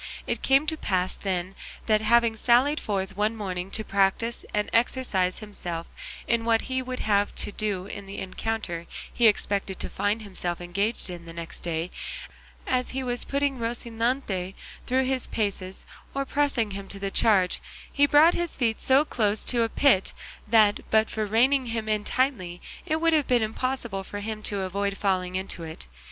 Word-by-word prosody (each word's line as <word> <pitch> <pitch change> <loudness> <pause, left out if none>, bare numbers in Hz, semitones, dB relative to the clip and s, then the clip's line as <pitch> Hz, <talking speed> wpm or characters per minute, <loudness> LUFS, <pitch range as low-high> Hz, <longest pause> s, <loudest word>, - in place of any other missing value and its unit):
It - - -2
came 270 +2 +4
to 315 - 0
pass, 185 -8 0
then, 185 -1 -2 0.3
that 215 -1 +3
having 230 +1 +4
sallied 250 +7 +3
forth 190 -2 -3
one 210 +3 +1
morning 185 -3 -4
to 220 - -2
practise 200 +4 +1
and 210 0 0
exercise 225 -6 +1
himself 175 -6 -3 0.4
in 235 0 +2
what 230 -1 +3
he 260 0 -2
would 255 0 -5
have 205 -1 +1
to - - -2
do 200 -3 -2
in 200 0 -7
the 195 - -7
encounter 190 -3 -3 0.3
he 235 - +5
expected 200 -2 0
to - - -3
find 215 +2 -1
himself 180 -3 -3
engaged 195 +4 -2
in 175 -1 -8
the 165 - -9
next 170 0 -7
day, 170 +1 -3 0.7
as 255 -1 0
he 265 - -1
was 245 -1 +3
putting 280 -2 0
Rocinante 230 -4 -2 0.3
through 260 +1 +2
his 260 -1 +2
paces 195 -3 -3 0.3
or 275 0 0
pressing 270 -7 +1
him 195 0 -6
to 200 - -4
the 195 0 -3
charge, 195 -5 +3 0.3
he 285 0 +5
brought 305 +4 +6
his 345 -1 -2
feet 230 -4 0
so 270 +3 +5
close 215 -6 0
to 240 -2 +2
a 230 - +2
pit 240 -7 +3 0.3
that 210 -2 +5
but 220 0 +3
for 215 -1 -2
reining 255 +5 +3
him 225 -1 -3
in 215 -1 0
tightly 215 -11 -1 0.3
it 315 -1 +1
would 330 0 +3
have 300 -3 +2
been 245 -3 +3
impossible 225 -3 -2
for 205 +2 -6
him 215 0 -4
to 205 -2 -2
avoid 200 +1 -2
falling 185 -2 0
into 190 -2 -4
it. 160 - -8
215 Hz, 180 wpm, -26 LUFS, 195-245 Hz, 0.7 s, brought